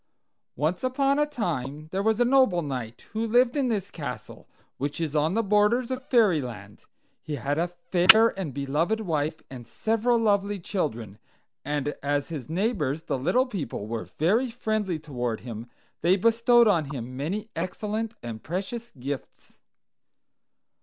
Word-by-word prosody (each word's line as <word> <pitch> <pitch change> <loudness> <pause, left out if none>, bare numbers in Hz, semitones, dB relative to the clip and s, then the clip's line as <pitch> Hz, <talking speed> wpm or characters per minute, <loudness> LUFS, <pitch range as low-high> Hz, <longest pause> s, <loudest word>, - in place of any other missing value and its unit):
"Once 155 - -1
upon 275 +2 +2
a 295 - +3
time 155 - -3
there 190 - -1
was 220 +2 +1
a 245 - +4
noble 250 -9 +4
knight, 125 -5 -5
who 225 +1 -1
lived 245 +3 +3
in 280 -3 +1
this 205 -4 -2
castle, 140 -6 -7 0.3
which 145 +3 -3
is 155 -2 -2
on 155 +5 +2
the 230 - +2
borders 210 +5 +2
of 260 0 -2
Fairyland. 140 - 0 0.4
He 150 - -4
had 145 +3 -1
a 170 - +1
fair 180 +5 +6
and 190 -9 -5
beloved 150 - 0
wife 155 -5 -2
and 125 -3 -9
several 225 +2 +1
lovely 205 -2 +1
children; 120 - -3 0.4
and 145 0 -1
as 145 0 -1
his 150 -4 -6
neighbors, 165 - -1
the 135 - -2
little 185 - +2
people, 155 - -5
were 115 +1 -5
very 220 - +2
friendly 215 -6 -1
toward 125 -7 -4
him, 115 -1 -7 0.3
they 175 +3 +4
bestowed 230 +3 +4
on 170 -7 +3
him 130 -3 -6
many 200 +11 -3
excellent 210 +6 -3
and 115 -2 -6
precious 200 - -5
gifts. 135 +2 -7
175 Hz, 155 wpm, -26 LUFS, 140-225 Hz, 0.4 s, fair